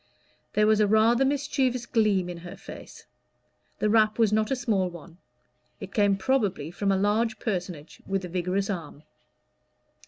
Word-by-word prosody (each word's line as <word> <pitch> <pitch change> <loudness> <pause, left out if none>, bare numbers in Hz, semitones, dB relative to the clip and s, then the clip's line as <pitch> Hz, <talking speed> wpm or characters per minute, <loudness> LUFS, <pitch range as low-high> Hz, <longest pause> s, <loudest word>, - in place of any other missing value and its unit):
There 210 - +3
was 215 0 +4
rather 220 +4 +3
a 270 - +4
mischievous 270 -3 0
gleam 210 -7 +1
in 175 -1 -7
her 175 +1 -9
face: - - -11 0.7
the - - 0
rap 215 0 +3
was 220 -3 +3
not 215 0 +1
a 270 - +1
small 205 -7 0
one; 170 0 -13 0.6
it 195 0 -9
came 205 -2 +3
probably 195 - 0
from 195 +2 -1
a 195 - +2
large 215 +3 +1
personage 180 -7 -5
with 195 -1 -2
a - - -5
vigorous 185 +2 -1
arm. 165 -6 -6
205 Hz, 160 wpm, -26 LUFS, 185-225 Hz, 0.7 s, was